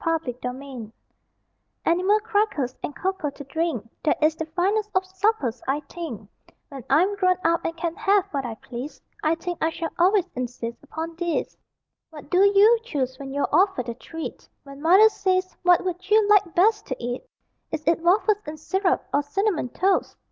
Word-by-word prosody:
ANIMAL 330 0 +2
CRACKERS 250 -2 -6 0.9
Animal 370 +5 +3
crackers, 410 - 0
and 290 - -5
cocoa 375 -5 -2
to 285 - -10
drink, 275 -5 -2 0.2
That 305 - +2
is 310 0 +4
the 320 0 -5
finest 395 +6 0
of 375 0 +2
suppers, 375 - -1
I 280 +3 0
think; 280 - -7 0.4
When 275 -4 -9
I'm 355 +9 +3
grown 370 -2 +3
up 335 0 +2
and 330 0 -3
can 335 0 -2
have 410 -3 +3
what 275 -2 -2
I 235 -3 -5
please 250 +6 -8 0.2
I 315 +1 +2
think 350 +1 -5
I 320 - +2
shall 330 0 -4
always 375 +1 +4
insist 240 -2 -5
upon 325 +3 -6
these. 345 -1 -2 0.5
What 300 -2 -12
do 360 - +4
you 405 +4 +6
choose 265 - -3
when 270 -1 -7
you're 285 +1 0
offered 350 - +2
a - - -2
treat? 325 +7 -8
When 275 0 -12
Mother 375 +7 +7
says, 370 -3 -1
"What 360 0 +4
would 365 +1 -4
you 430 -1 +5
like 405 -5 +4
best 420 +4 +3
to 260 - -2
eat?" 245 +1 -4 0.5
Is 315 -1 -3
it 335 0 +2
waffles 405 +4 +3
and 305 0 -6
syrup, 380 +3 0
or 285 - +3
cinnamon 340 - -1
toast? 380 +8 0
330 Hz, 180 wpm, -24 LUFS, 280-380 Hz, 0.9 s, Mother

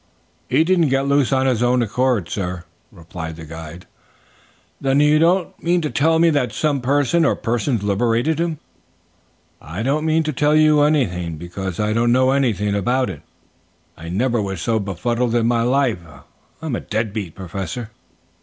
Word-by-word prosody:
"He 160 - +3
didn't 170 -3 +2
get 135 +1 +1
loose 140 -2 +2
of 130 -1 +2
his 125 -4 +1
own 125 0 +2
accord, 120 -3 0
sir," 90 -2 -4 0.3
replied 80 -3 -8
the 80 0 -10
guide. 80 +2 -9 1.0
"Then 135 0 +2
you 150 +1 +4
don't 175 +3 +2
mean 175 +1 +2
to 150 - -3
tell 160 +3 +2
me 165 0 +4
that 135 -6 0
some 145 -3 0
person 145 +5 +2
or 160 - +2
persons 115 -1 -1
liberated 115 +9 +1
him?" 165 -2 -1 1.0
"I 85 +9 -6
don't 145 +5 0
mean 160 +1 +2
to 155 0 -2
tell 150 +3 +2
you 155 -1 +5
anything, 90 - 0
because 90 +3 -6
I 105 0 0
don't 120 +1 +2
know 130 +1 +3
anything 110 -7 +1
about 120 +3 0
it. 75 - -10 0.7
I 85 +1 -9
never 115 +5 0
was 95 -3 -4
so 110 +6 0
befuddled 115 +5 -1
in 115 -1 +2
my 120 0 +2
life. 125 -4 +1 0.6
I'm 155 -5 -3 0.2
dead 110 -1 -1
beat, 100 -7 -5
Professor." 95 +5 -6
120 Hz, 170 wpm, -20 LUFS, 100-145 Hz, 1.0 s, you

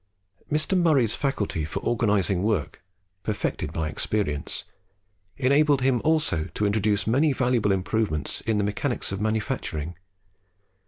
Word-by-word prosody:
Mr. 155 +5 +1
Murray's 150 - +3
faculty 105 - -1
for 75 - -3
organising 105 -5 +1
work, 100 -7 -1 0.4
perfected 105 0 -2
by 80 -1 -2
experience, 75 -3 -2 0.7
enabled 140 +1 +3
him 130 -2 +2
also 155 - +2
to 105 - 0
introduce 105 0 +1
many 140 +7 +3
valuable 125 -5 +1
improvements 95 -4 -1
in 110 -2 0
the 105 - +1
mechanics 105 +5 -2
of 95 +1 -3
manufacturing. 105 - -2
110 Hz, 120 wpm, -25 LUFS, 95-135 Hz, 0.7 s, Murray's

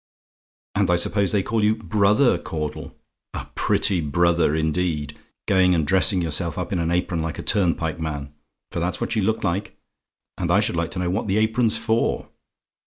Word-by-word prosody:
"And - - +1
I 90 - +4
suppose 100 +2 +1
they 100 -3 +1
call 110 +1 0
you 105 +1 +3
BROTHER 105 0 +2
Caudle? 75 -3 -5 0.4
A - - -5
pretty 90 -4 +1
brother, 85 0 +2
indeed! 80 -2 -1 0.3
Going 95 -2 +4
and 80 -3 +1
dressing 95 +2 +3
yourself 80 0 -2
up - - -3
in 90 - 0
an 85 0 0
apron 85 -1 0
like 80 -1 -4
a - - -6
turnpike 85 -3 0
man 75 -3 -4 0.4
for - - -3
that's 90 +1 -2
what - - -2
you 110 - +2
look 110 +3 0
like. 95 +2 -2 0.6
And 85 -2 -1
I 95 +3 +4
should 105 - 0
like 85 -1 -1
to - - -1
know 90 -1 -1
what 105 +3 -2
the 95 +1 +1
apron's 110 +1 +2
for? 115 +1 0
90 Hz, 185 wpm, -23 LUFS, 80-100 Hz, 0.6 s, I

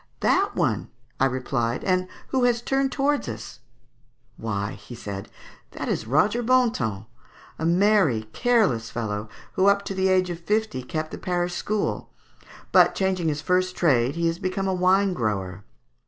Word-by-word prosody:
"That - - +2
one," - - 0 0.3
I 135 - +4
replied, 125 -2 -1
"and 185 -1 +1 0.2
who 260 -2 +1
has 240 -1 +1
turned 270 +1 +1
towards 285 - 0
us?" 110 -1 -8 0.8
"Why," 100 -2 -4 0.2
said 100 -4 -6
he, - - -20
"that - - -3
is - - -2
Roger 180 - +2
Bontemps, 225 - +1 0.5
a 160 - 0
merry 175 - +3
careless 210 - +2
fellow, 105 -2 -4 0.2
who 190 - +3
up 200 0 +3
to 195 - -3
the 190 0 +1
age 185 -1 +2
of 170 - -5
fifty 210 -5 -1
kept 155 +5 -4
the - - -7
parish 175 -1 -1
school; 210 +3 -2 0.6
but - - +5
changing 190 -3 0
his 150 0 -1
first 185 0 +1
trade 135 -5 +2
he 170 0 -1
has 165 +1 0
become 195 +1 -2
a 190 - +1
wine 185 +2 +3
grower. 100 - -3
175 Hz, 160 wpm, -24 LUFS, 120-200 Hz, 0.8 s, but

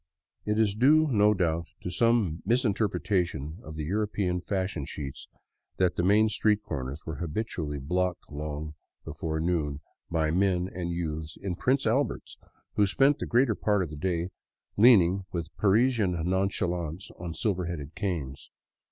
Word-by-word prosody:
It 105 0 0
is 110 -3 +3
due, 145 +8 +5
no 105 -2 +4
doubt, 85 -3 0 0.2
to 90 - -3
some 105 -5 +2
misinterpretation 100 - 0
of 80 - -9
the 80 - -4
European 95 0 -1
fashion 95 -5 -2
sheets 70 -1 -7 0.5
that 90 -2 +2
the - - 0
main 105 +4 +4
street 105 0 +1
corners 70 -1 -5
were 80 -3 -5
habitually 80 -3 -3
blocked 90 +6 -1
long 75 +1 -5 0.3
before 80 -1 -3
noon 80 -4 -1 0.3
by 80 -2 +1
men 90 0 +2
and 85 -1 -3
youths 80 -2 -4
in 100 -2 -3
Prince 130 +8 +1
Alberts, 130 +6 -1 0.3
who 105 - +3
spent 140 +8 +3
the - - -3
greater 120 -1 +3
part 105 -1 +1
of 80 - -6
the - - -6
day 85 +2 -1 0.5
leaning 100 -5 +5
with 85 -2 -5
Parisian 110 -1 +3
nonchalance 90 -2 -1
on 85 -2 -5
silver 95 -3 0
headed 80 -3 -5
canes. 85 -9 -4
90 Hz, 150 wpm, -28 LUFS, 80-105 Hz, 0.5 s, due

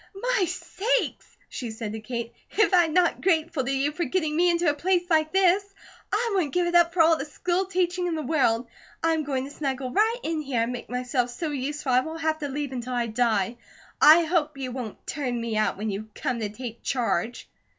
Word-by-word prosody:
"My - - +1
sakes!" 485 +9 -2
she 245 - -6
said 220 -1 -5
to 220 - -5
Kate. 235 +1 -5 0.2
"If 425 -2 +2
I'm 345 -3 +5
not 350 +1 +2
grateful 325 -5 +1
to 260 - -2
you 275 +2 +1
for 345 +3 -2
getting 310 +1 -1
me 350 +2 +4
into 340 0 +1
a 295 - +4
place 355 +4 +1
like 315 -1 +3
this. 385 +1 +4 0.5
I 460 +2 +1
wouldn't 350 -7 0
give 355 -1 +3
it 345 - -1
up 345 -1 +5
for 335 -1 +4
all 325 0 +5
the 275 - -4
school 355 +5 -1
teaching 360 -1 0
in 340 - -1
the 310 - -3
world. 255 -5 +2 0.4
I'm 325 -1 +2
going 270 -2 -2
to 280 - -9
snuggle 265 -3 -3
right 440 - +3
in 320 -1 -1
here, 265 -6 0
and 240 +2 -2
make 245 - -7
myself 250 0 -1
so 305 +6 -4
useful 285 0 -3
I 250 - +5
won't 320 +5 -5
have 315 -1 0
to 295 - -3
leave 285 0 -3
until 250 -1 -4
I 240 -1 0
die. 230 -1 0 0.4
I 320 +3 +8
hope 315 -3 0
you 260 -2 -4
won't 245 -4 -7
turn 250 -5 -2
me 230 -1 -3
out 215 -2 +1
when 215 +1 -2
to 210 +3 -5
come 245 -2 -1
to 215 -2 -2
take 235 +1 -8
charge." 240 -3 -1
295 Hz, 225 wpm, -26 LUFS, 245-345 Hz, 0.5 s, I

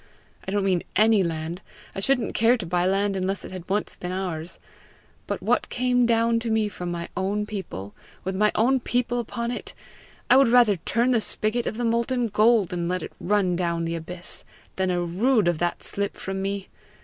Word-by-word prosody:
I - - -2
don't 205 0 +1
mean 185 -3 +2
ANY 215 -1 +5
land; 165 +1 -3 0.3
I - - -4
shouldn't 245 +3 +1
care 230 +3 +4
to 205 - -5
buy 175 +1 +1
land 195 +1 +1
unless 190 +1 -2
it - - -9
had 185 -1 -8
once 205 +2 -1
been 180 - -5
ours; 180 -3 -4 0.7
but - - -3
what - - +1
came 245 -1 +2
down 230 0 +3
to 230 0 -4
me 220 -1 +1
from 180 -3 -5
my 170 -1 -4
own 200 +3 -1
people 135 - -6 0.3
with 190 +1 -3
my 210 +2 +3
own 260 +4 +3
people 245 0 0
upon 235 +1 -3
it 245 - -6 0.5
I 255 - +6
would 270 -1 +6
rather 230 -4 +5
turn 235 +9 +1
the 235 -3 +3
spigot 215 +3 -1
of 215 - -3
the 240 - -1
molten 235 +1 +1
gold 210 -2 +3
and 170 -1 -2
let 180 -2 -1
it - - -8
run 195 -2 +1
down 170 -1 -1
the 165 - -2
abyss, 170 +2 -4 0.3
than 190 0 0
a 175 -1 0
rood 210 +4 +2
of 175 -3 +1
that 175 0 -1
slip 200 0 -3
from 195 0 -4
me! 195 0 -3
200 Hz, 205 wpm, -25 LUFS, 180-230 Hz, 0.7 s, I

